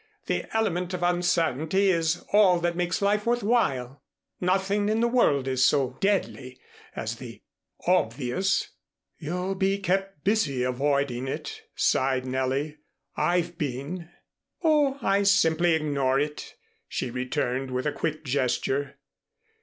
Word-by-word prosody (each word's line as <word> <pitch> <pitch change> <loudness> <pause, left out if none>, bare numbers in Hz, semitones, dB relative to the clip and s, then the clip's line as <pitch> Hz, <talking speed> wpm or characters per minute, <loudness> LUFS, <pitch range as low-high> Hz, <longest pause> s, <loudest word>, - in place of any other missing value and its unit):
"The - - -1
element 180 -4 0
of 175 - -4
uncertainty 175 +1 +2
is 165 -1 0
all 195 -4 +5
that 170 0 0
makes 175 +2 -1
life 210 +2 +1
worth 240 0 +1
while. 140 - 0 0.4
Nothing 195 +3 +1
in 220 +1 +1
the 235 - +3
world 150 - +2
is 130 -1 +1
so 130 -1 +2
deadly 140 -10 -1 0.4
as - - -4
the - - -10 0.4
obvious." 180 0 +1 0.5
"You'll 180 +4 -2
be 195 +1 +1
kept 195 -3 -2
busy 155 - +1
avoiding 135 0 0
it," 135 - -5
sighed 130 -1 +1
Nellie. 130 +4 -2 0.4
"I've 175 -1 0
been." 150 +5 -4 0.5
"Oh, 295 -4 +3
I 195 +1 +3
simply 175 -4 +3
ignore 140 -4 +1
it," 150 +1 -4 0.3
she 125 - -3
returned, 130 +1 -2
with 125 +1 -2
a 150 - +1
quick 155 +1 -3
gesture. 135 +1 -1
165 Hz, 130 wpm, -26 LUFS, 135-195 Hz, 0.5 s, all